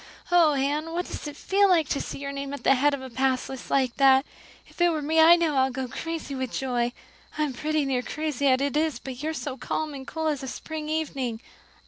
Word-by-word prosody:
Oh, 335 -4 +5
Anne, 295 +4 -1
what 355 +1 -1
does - - -6
it 295 - -7
feel 400 +1 +3
like 330 -5 +4
to - - 0
see - - -6
your 280 0 -5
name 280 0 -4
at - - -11
the - - +5
head 285 +2 +3
of 265 - -9
a 260 - -7
pass 260 +1 0
list 265 -1 -8
like 260 -3 +1
that? 270 0 +5 0.4
If - - -10
it 350 - +6
were 310 -3 -1
me 320 +2 +2
I 330 +2 +9
know 325 -5 +1
I'd 265 0 +2
go 260 0 -3
crazy 325 +3 -5
with 260 -2 -3
joy. 245 -2 -1 0.5
I 305 - +1
am 290 -3 -2
pretty 305 +3 -1
near 260 -2 0
crazy 290 0 -2
as 260 -1 +4
it 280 0 -1
is, 310 -1 +1
but 260 -1 -8
you're 310 - -2
as 320 -1 -4
calm 310 -1 -3
and 270 -1 -8
cool 320 -1 -4
as 295 -3 -1
a 265 - -6
spring 305 +3 -6
evening." 275 -7 -2
285 Hz, 250 wpm, -26 LUFS, 265-315 Hz, 0.5 s, I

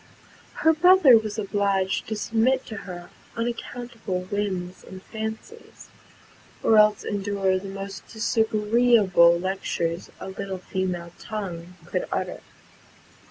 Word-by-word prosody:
Her 320 - +7
brother 355 -5 +7
was 220 -1 0
obliged 200 -2 0
to 220 - -2
submit 230 +5 +1
to 220 - -7
her 175 -1 -8 0.3
unaccountable 235 -4 -4
whims 185 -2 -3
and 190 0 -11
fancies, 220 - -8 0.7
or 220 - +5
else 210 -1 +5
endure 195 -2 0
the 195 +1 -8
most 195 0 -7
disagreeable 220 -5 +3
lectures 175 -2 -2
a - - -7
little 195 0 -5
female 180 -2 -3
tongue 180 -5 -6
could 180 +1 -3
utter. - - -3
200 Hz, 115 wpm, -25 LUFS, 185-225 Hz, 0.7 s, Her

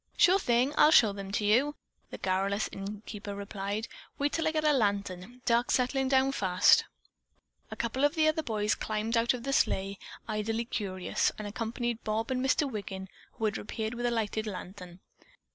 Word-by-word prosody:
"Sure 370 +2 +6
thing. 250 -1 +2
I'll 300 - +8
show 225 -9 +6
them 195 -1 -7
to 210 - 0
you," 260 +8 +3 0.3
the - - -7
garrulous 195 +2 0
innkeeper 205 +1 -7
replied. 200 +2 -4 0.3
"Wait 285 +1 0
till 325 - 0
I - - +2
get 310 -1 -1
a 300 -1 +4
lantern. 205 0 -1
Dark's 235 +1 +3
settling 265 +1 +1
down 265 0 +3
fast." 185 -5 +4 0.8
A - - -6
couple 235 +4 -2
of 290 +3 +3
the 315 -1 +3
other 310 0 +2
boys 210 -6 0
climbed 215 +2 -2
out 235 +2 +3
of 240 - -8
the 275 +1 -2
sleigh, 195 -5 +1 0.3
idly 220 +1 -2
curious, 190 -6 -1
and 215 - -5
accompanied 230 +2 -3
Bob 220 +2 -2
and 255 0 0
Mr. 275 +2 +2
Wiggin, 195 -5 -6 0.2
who 225 - -3
had 210 - 0
reappeared 220 +1 -4
with 240 0 -2
a - - 0
lighted 220 -1 -1
lantern. 185 -2 -8
220 Hz, 180 wpm, -30 LUFS, 200-255 Hz, 0.8 s, I'll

